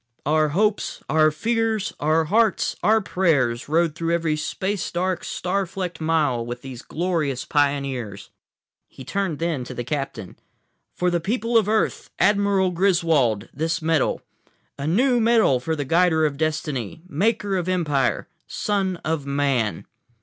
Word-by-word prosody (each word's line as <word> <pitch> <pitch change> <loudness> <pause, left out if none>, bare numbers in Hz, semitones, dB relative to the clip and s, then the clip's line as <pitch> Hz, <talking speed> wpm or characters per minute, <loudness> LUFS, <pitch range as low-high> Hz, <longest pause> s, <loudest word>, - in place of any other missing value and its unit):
"Our 155 +1 +2
hopes, 210 +7 0
our 155 0 +4
fears, 220 +5 -1
our 155 +2 +2
hearts, 215 +3 +2
our 220 +1 +4
prayers 145 - +1
rode 165 0 +2
through 165 +1 -1
every 165 -2 0
space 190 +5 -3
dark, 180 0 -1
star 190 +2 -2
flecked 180 -2 -5
mile 155 -7 +1
with 120 +1 -7
these 130 -3 -8
glorious 155 -6 -2
pioneers." 135 -8 -1 0.6
He 130 - -12
turned 190 0 -2
then 165 -5 -2
to 125 - -8
the 120 - -3
captain. 135 -6 -5 0.6
"For 180 0 +1
the 175 - +1
people 230 +6 -2
of 215 -3 +4
Earth, 220 0 0
Admiral 200 -2 +3
Griswold, 165 - +2
this 160 +3 -1
medal. 160 -3 0 0.5
A 140 +1 -4
new 245 +9 +3
medal 225 - +4
for 160 +6 -2
a 145 -3 -2
Guider 165 +1 +3
of 145 -2 -1
Destiny, 155 - -3
Maker 200 +4 0
of 180 -1 -1
Empire, 150 -8 0 0.2
Son 195 -3 -1
of 155 -3 -2
Man!" 140 -6 0
165 Hz, 145 wpm, -23 LUFS, 140-190 Hz, 0.6 s, our